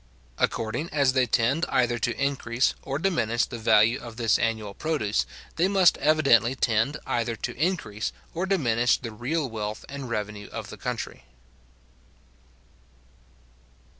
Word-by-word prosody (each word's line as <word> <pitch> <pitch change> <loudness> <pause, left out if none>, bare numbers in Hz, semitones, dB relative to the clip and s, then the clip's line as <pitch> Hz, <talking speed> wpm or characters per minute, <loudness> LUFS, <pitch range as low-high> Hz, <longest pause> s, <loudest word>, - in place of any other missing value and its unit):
According 115 +9 -1
as 140 -3 +2
they 130 -2 +3
tend 125 +9 +2
either 120 -2 +1
to 120 +1 -1
increase 130 -3 +1
or 140 0 -3
diminish 120 - +1
the 120 - -7
value 110 +2 +4
of 115 -2 -10
this 115 -2 +2
annual 110 -3 -1
produce, 140 -7 -1 0.3
they 170 +3 +3
must 190 -3 +5
evidently 135 -6 +4
tend 115 +4 +1
either 115 -1 -1
to - - -5
increase 145 - -1 0.2
or 180 +3 -2
diminish 120 - +2
the 115 -3 -7
real 135 +8 -2
wealth 110 -2 -5
and 140 -2 -7
revenue 105 -2 -4
of - - -6
the - - -9
country. 60 - -5
120 Hz, 135 wpm, -26 LUFS, 110-145 Hz, 0.3 s, must